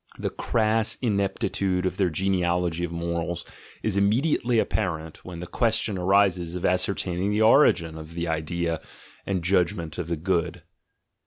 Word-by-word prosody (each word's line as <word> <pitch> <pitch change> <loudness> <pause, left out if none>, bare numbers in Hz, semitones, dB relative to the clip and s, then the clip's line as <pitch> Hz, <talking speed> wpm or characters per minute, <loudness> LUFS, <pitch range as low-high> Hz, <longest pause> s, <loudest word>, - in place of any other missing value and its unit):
The - - -3
crass 110 -1 +1
ineptitude 95 -3 0
of 95 - -1
their 95 -3 +2
genealogy 90 -1 0
of 85 - -2
morals 85 0 -3 0.4
is 105 -3 0
immediately 120 +4 +2
apparent 80 -8 -2
when 90 -2 -8
the - - -5
question 110 +1 0
arises 90 -2 +2
of 90 - -5
ascer 90 +2 +2
taining 90 +2 -2
the 105 +1 +2
origin 110 - +4
of 80 +1 -10
the 85 0 -2
idea 80 0 -2 0.5
and 95 -3 -1
judgment 90 -3 0
of 85 -2 -3
"good. 85 -2 -1
90 Hz, 145 wpm, -25 LUFS, 85-100 Hz, 0.5 s, origin